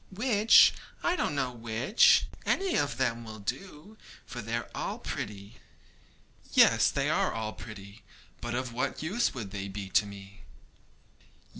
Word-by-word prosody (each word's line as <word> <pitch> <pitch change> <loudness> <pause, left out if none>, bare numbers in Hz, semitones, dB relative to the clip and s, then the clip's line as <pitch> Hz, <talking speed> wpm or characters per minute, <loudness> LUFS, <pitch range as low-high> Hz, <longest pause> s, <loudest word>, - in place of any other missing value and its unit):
'Which? 215 +1 +5 0.3
I 345 - +2
don't 145 - -1
know 130 -3 -1
which; 120 - +3 0.2
any 385 -2 0
of 140 -5 0
them 120 -3 -1
will 110 -1 -9
do, 185 - -7 0.3
for 120 -2 -7
they 115 +1 -3
are 120 - -3
all - - -4
pretty.' 100 +1 -7 1.0
'Yes, - - +5
they - - -1
are - - +1
all 110 -1 -4
pretty; 100 -1 -11 0.4
but 120 0 -3
of 125 -1 -3
what 130 +5 -2
use 200 - 0
would 110 -6 -6
they 100 -1 -5
be 100 0 -6
to 105 +2 +2
me?' 100 0 -12
120 Hz, 150 wpm, -29 LUFS, 105-150 Hz, 1.0 s, Which